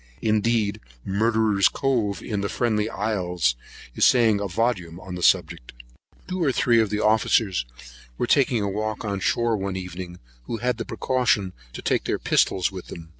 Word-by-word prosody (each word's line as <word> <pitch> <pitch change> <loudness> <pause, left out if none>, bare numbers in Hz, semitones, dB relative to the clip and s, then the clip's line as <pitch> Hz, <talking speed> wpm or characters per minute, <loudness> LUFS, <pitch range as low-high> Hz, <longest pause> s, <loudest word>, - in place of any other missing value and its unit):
Indeed 110 -1 +1 0.3
Murderer's 110 0 +2
Cove, 120 -8 -1
in 105 -3 -3
the 100 - -2
Friendly 110 -3 0
Isles, 90 - -1 0.4
is - - -1
saying 115 -5 +5
a 100 - -2
volume 90 -4 -1
on 95 0 -9
the 90 - -5
subject. 85 -8 +1 0.5
Two 185 -1 -2
or 140 - +3
three 120 -2 +3
of 110 - 0
the 105 - -1
officers 105 - +2 0.5
were - - 0
taking 125 -4 +2
a - - -1
walk 110 +3 -3
on 100 -2 -2
shore 115 +3 +1
one 95 -2 -3
evening, 90 -1 -7 0.3
who 115 - -4
had 125 0 -1
the 115 - -3
precaution 115 -7 0 0.2
to - - -8
take - - 0
their - - 0
pistols 95 -1 +1
with 95 -2 -8
them. 80 -1 -10
105 Hz, 175 wpm, -24 LUFS, 95-115 Hz, 0.5 s, saying